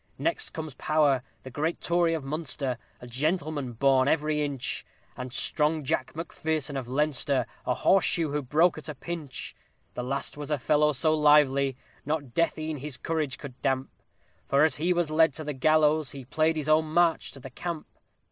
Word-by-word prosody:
Next 335 - -1
comes 155 -3 -6
POWER, 145 -2 +2 0.2
the 130 - -9
great 155 +6 -2
Tory 170 -1 +2
of 155 - -4
Munster, 135 -3 -2 0.2
a - - -9
gentleman 145 +1 -2
born 130 +2 +3
every 150 0 +1
inch, 140 -4 -2 0.3
And 125 0 -6
strong 150 +3 +2
JACK 130 +1 -1
MACPHERSON 160 -3 -2
of 130 -3 -4
Leinster, 140 -1 +1 0.2
a 125 - +2
horse 195 -1 +4
shoe 165 -5 +2
who 150 0 -1
broke 155 +5 +2
at 155 - -8
a 150 - -5
pinch; 155 -3 -6 0.4
The - - -4
last 135 +3 -2
was 145 0 -6
a 150 - +1
fellow 150 +3 +2
so 155 +4 +2
lively, 140 -3 +4 0.3
not 145 -4 -3
death 165 -2 +1
e'en 155 -1 -3
his 140 -1 -5
courage 155 -5 -2
could 130 -3 -10
damp, 135 0 0 0.6
For 140 +2 +4
as 160 - +3
he 170 +4 +1
was 175 -3 +1
led 160 -2 +4
to 160 - -3
the 150 0 -3
gallows, 155 +1 +3
he 135 -2 -8
played 155 +5 +1
his 155 -1 -3
own 155 +1 +4
"march 170 0 +2
to 135 - -7
the 130 0 -10
camp." 170 +3 -5
150 Hz, 185 wpm, -27 LUFS, 135-155 Hz, 0.6 s, horse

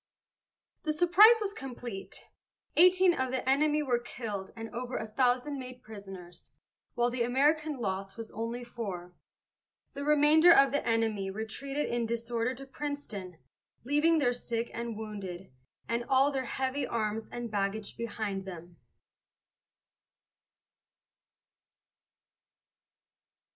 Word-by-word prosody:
The 310 - -1
surprise 355 +8 +7
was 405 -1 -2
complete. 245 - -7 0.5
Eighteen 365 +1 +6
of 260 -5 -1
the 260 0 -3
enemy 300 +3 +3
were 245 -4 +1
killed 220 -5 -6
and 225 -1 -6
over 250 +1 -4
a 220 - -3
thousand 250 +5 +1
made 250 -1 -9
prisoners, 195 -5 -11 0.5
while 240 0 +2
the 245 0 -3
American 295 +5 +2
loss 195 -3 -3
was 225 -1 -7
only 230 +2 -4
four. 195 -7 -6 0.8
The 280 - -5
remainder 300 +3 +6
of 275 -4 +6
the 285 - 0
enemy 220 -4 +1
retreated 245 +8 -3
in 235 -1 -1
disorder 235 +1 -2
to 275 +2 -9
Princeton, 265 - -6 0.5
leaving 295 +6 +3
their 250 -5 +2
sick 235 -1 -3
and 235 -2 -4
wounded, 195 -5 -7 0.4
and 235 +2 -1
all 270 +2 +4
their 265 -2 -2
heavy 265 +3 -2
arms 220 -1 -2
and 240 -2 -6
baggage 200 0 -2
behind 210 -4 -4
them. 175 -2 -9
240 Hz, 120 wpm, -30 LUFS, 215-280 Hz, 0.8 s, surprise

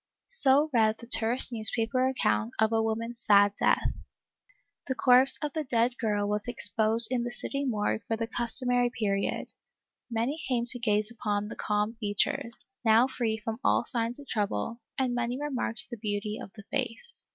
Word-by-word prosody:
So 300 - +4
read 220 -2 +2
the 235 - -12
terse 235 +2 +4
newspaper 230 +2 +1
account 110 - 0
of 220 0 +2
a 225 - +2
woman's 230 +2 -3
sad 205 0 +4
death. - - +2 1.0
The 260 - -2
corpse 255 +1 +6
of 295 - -3
the 315 - -2
dead 240 -2 0
girl 210 -3 -1
was 210 +2 -2
exposed 225 -1 +3
in 245 -2 0
the 240 - -4
city 275 +3 -3
morgue 215 -3 -1
for 225 - -1
the 230 - -2
custom 240 +2 -2
ary 245 0 +2
period; 200 -4 -2 0.6
many 240 +7 -2
came 245 -5 -1
to 245 - 0
gaze 215 -1 0
upon 210 -3 -3
the - - -7
calm 210 +2 -2
features, 230 +4 -1 0.3
now 225 +1 +5
free 235 -4 -2
from 220 +1 -6
all - - +2
signs 235 +1 -3
of 285 - -13
trouble, 210 - -3 0.2
and 260 -2 0
many 245 +1 -2
remarked 265 -5 -3
the 235 - -6
beauty 210 0 -4
of - - -9
the 210 - -11
face. 265 - -3
230 Hz, 175 wpm, -28 LUFS, 215-250 Hz, 1.0 s, corpse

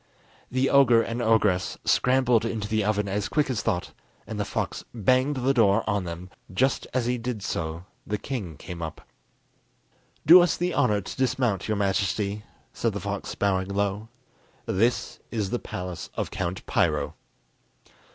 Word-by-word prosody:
The 130 +1 +1
ogre 125 -5 +6
and 115 +1 -3
ogress 105 -5 +2
scrambled 125 -3 +3
into 115 -3 -2
the 110 0 +1
oven 105 0 0
as 100 +1 -2
quick 150 -3 +1
as 120 - -1
thought, 90 - -1 0.3
and - - -6
the - - 0
fox - - -3
banged 130 +6 +2
the 130 +1 +1
door 115 -3 +3
on 100 -3 0
them; 85 +2 -7 0.2
just 130 +8 +1
as 125 -2 0
he 125 0 0
did 115 -3 -4
so 80 0 -3 0.2
the 105 - -1
king 100 - -5
came 85 +1 -8
up. 80 -2 -7 1.2
"Do 175 +4 +10
us 175 - +2
the 175 0 -1
honour 105 -1 +2
to 95 - -7
dismount, 130 -6 0
your 110 -1 0
Majesty," 100 +1 0 0.3
said - - -1
the - - -3
fox, - - -4
bowing 95 -2 +1
low. 100 +2 -1 0.6
"This 115 +6 0
is 105 -5 -2
the 120 - 0
palace 90 -1 -6
of - - -3
Count 95 0 -3
Piro!" - - +1
105 Hz, 160 wpm, -26 LUFS, 95-125 Hz, 1.2 s, Do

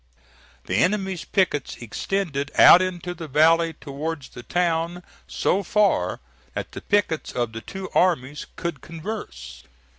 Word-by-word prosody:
The 95 - -1
enemy's 190 - 0
pickets 185 -7 0
extended 145 - -2
out 180 - +9
into 180 -1 -3
the 165 -2 -8
valley 165 +3 +4
towards 145 0 -5
the - - -10
town, 170 +3 -1 0.2
so 195 - +1
far 205 +2 +1 0.4
that - - -4
the - - -8
pickets 200 -6 0
of 120 -2 -2
the 115 - -6
two 190 - -7
armies 150 -6 +1
could 170 -5 -4
converse. 165 - -7
165 Hz, 130 wpm, -24 LUFS, 145-185 Hz, 0.4 s, out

